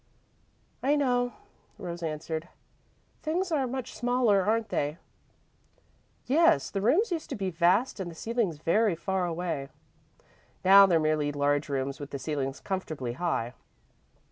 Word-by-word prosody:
"I 285 +3 +3
know," 245 -4 +1 0.4
Rose 175 -1 -6
answered. 160 +1 -4 0.7
"Things 345 +4 -1
are 280 -5 +1
much 260 0 -5
smaller, 240 -3 +2
aren't 220 +3 0
they?" 145 -1 -1 1.3
"Yes. 330 +5 +3
The 195 - -2
rooms 330 - +3
used 330 -3 -3
to - - -3
be 195 -3 -2
vast 180 +9 +2
and 185 -2 -3
the 165 - -10
ceilings 225 -4 -1
very 195 +5 +2
far 185 +1 -1
away. 165 -5 -3 1.0
Now, 195 +1 +9
they're 170 -3 +3
merely 155 -1 +1
large 145 +1 0
rooms 135 0 -2
with 145 -1 -7
the 140 - -4
ceilings 135 -1 -3
comfortably 155 -11 -4
high. 125 -6 -2
180 Hz, 140 wpm, -28 LUFS, 155-240 Hz, 1.3 s, Now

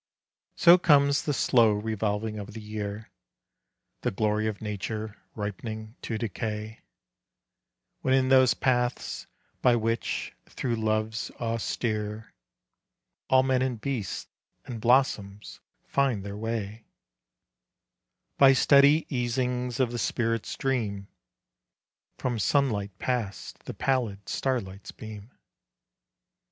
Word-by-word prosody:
So 175 +1 +7
comes 140 -3 +4
the 150 - -1
slow 115 -5 +4
revolving 105 0 -2
of 105 +1 -8
the - - -5
year, 105 0 -6 0.9
The - - +1
glory 105 +2 0
of 105 -2 -3
nature 105 +1 -5
ripening 110 +2 -5
to 115 - -3
decay, 110 0 -4 1.2
When 130 0 +2
in 130 -1 +2
those 130 -1 +6
paths, 125 -2 -1 0.3
by 125 -1 +5
which, 115 0 -1 0.2
through 120 -3 -2
loves 110 0 -1
austere, 110 -2 -2 1.0
All 130 0 +5
men 130 -1 +2
and 130 -3 -1
beasts 120 -7 -3 0.4
and 120 -4 -6
blossoms 110 -5 +1 0.3
find 130 -8 0
their 100 0 -5
way, 110 0 -4 1.6
By 135 -1 +8
steady 140 +3 +5
easings 125 0 -1
of 125 -3 +2
the 120 - -3
spirit's 115 -1 -1
dream, 105 -7 -2 1.1
From 120 -3 -2
sunlight 105 -6 +1
past 115 -7 -3
the - - -5
pallid 120 -7 -1
starlight's 100 -7 -2
beam. 110 0 -10
115 Hz, 105 wpm, -27 LUFS, 105-130 Hz, 1.6 s, By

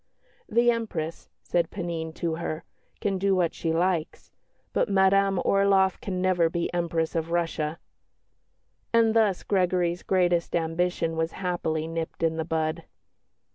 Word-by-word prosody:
"The 240 0 +4
Empress," 180 -9 -4
said 170 -2 0
Panine 170 -4 -4
to 165 -2 -2
her, 165 -1 -4 0.4
"can 195 -4 0
do 195 0 +2
what 175 -3 +1
she 165 - -2
likes; 170 -1 -1 0.4
but - - +1
Madame 195 0 +3
Orloff 195 -1 +3
can 185 -2 -3
never 180 -3 +2
be 170 +1 -2
Empress 170 -2 -1
of 165 0 -2
Russia." 165 -2 -1 1.1
And 230 -1 +4
thus 215 -5 +2
Gregory's 180 -2 +1
greatest 175 -2 +1
ambition 165 0 0
was 160 0 -1
happily 170 -4 -2
nipped 165 0 -4
in 160 0 +1
the 160 - -2
bud. 160 0 -2
175 Hz, 135 wpm, -26 LUFS, 165-190 Hz, 1.1 s, The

